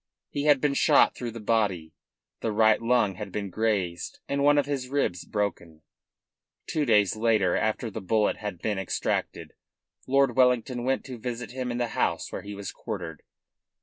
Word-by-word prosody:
He 145 0 -2
had 145 -2 +5
been 145 0 +1
shot - - +4
through 120 - -5
the 115 0 -8
body, 100 -8 0 0.5
the 115 - -2
right 110 +1 +4
lung 115 -4 +2
had - - -6
been 100 -2 -4
grazed 95 -5 -1
and 140 0 0
one 145 +1 +5
of 145 - +3
his 135 -3 -3
ribs 135 -11 -1
broken. 85 -6 -3 0.8
Two 155 -2 -1
days 105 -4 +4
later, 110 -5 +2
after 110 +1 -1
the 110 - -6
bullet 105 +2 +1
had 105 -5 -6
been 105 -3 -1
extracted, 95 - -2 0.5
Lord 135 -2 +3
Wellington 125 -1 +2
went 135 +1 0
to 125 -3 -8
visit 120 -1 -5
him 130 0 -4
in 120 - -3
the 120 -1 -1
house - - -1
where - - -5
he 100 0 -8
was 100 -1 -6
quartered. 80 -3 -6
110 Hz, 180 wpm, -27 LUFS, 100-125 Hz, 0.8 s, had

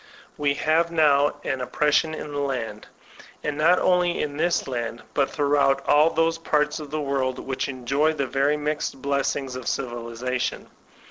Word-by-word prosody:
We 145 -1 0
have 165 +3 +1
now 145 -3 +3
an 135 -2 -2
oppression 150 +4 +1
in 150 - -7
the 145 - -3
land, 120 -7 -3 0.3
— - - -20
and 150 -1 -2
not 165 +4 +4
only 180 -1 +2
in 145 -1 -2
this 170 0 +1
land, 120 -2 -4
but 140 -2 +1
throughout 140 -2 +1
all 150 +2 +5
those 165 0 +1
parts 150 -2 0
of 150 -2 -8
the 155 +2 -3
world 135 -3 -1
which 135 +1 -3
enjoy 135 +4 0
the 140 -3 -1
very 140 +3 +1
mixed 150 -2 -3
blessings 140 -1 -1
of 130 -1 -7
Civilization. 120 0 -3
145 Hz, 170 wpm, -24 LUFS, 130-155 Hz, 0.3 s, all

